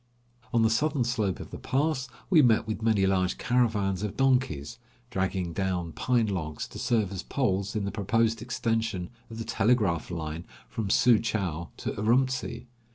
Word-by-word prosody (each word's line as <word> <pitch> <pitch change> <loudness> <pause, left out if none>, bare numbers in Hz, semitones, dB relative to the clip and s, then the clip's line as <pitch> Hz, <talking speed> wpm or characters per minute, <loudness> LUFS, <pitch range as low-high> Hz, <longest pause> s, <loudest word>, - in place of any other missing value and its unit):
On 115 -1 +3
the 110 - +4
southern 145 +2 +1
slope 110 -6 -1
of - - -9
the - - -7
pass 135 -1 0 0.2
we 165 -4 +7
met 115 -5 +4
with 110 0 -4
many 110 -3 +3
large 95 -1 +1
caravans 105 -6 +1
of 105 -2 -4
donkeys, 125 - +1 0.3
dragging 95 -3 -1
down 90 -3 -1
pine 120 +8 +1
logs 85 -7 -3
to - - -9
serve 115 -6 +1
as 95 -2 -4
poles 100 -7 -1
in 105 -2 -1
the 100 - -2
proposed 115 +2 +1
extension 115 -6 -1 0.2
of 115 - -8
the 115 - -4
telegraph 105 -6 +1
line 80 -1 -4 0.2
from 110 -3 -4
Su 120 +2 +5
Chou 90 -7 -2
to - - -3
Urumtsi. 125 +4 0
110 Hz, 165 wpm, -28 LUFS, 95-120 Hz, 0.3 s, we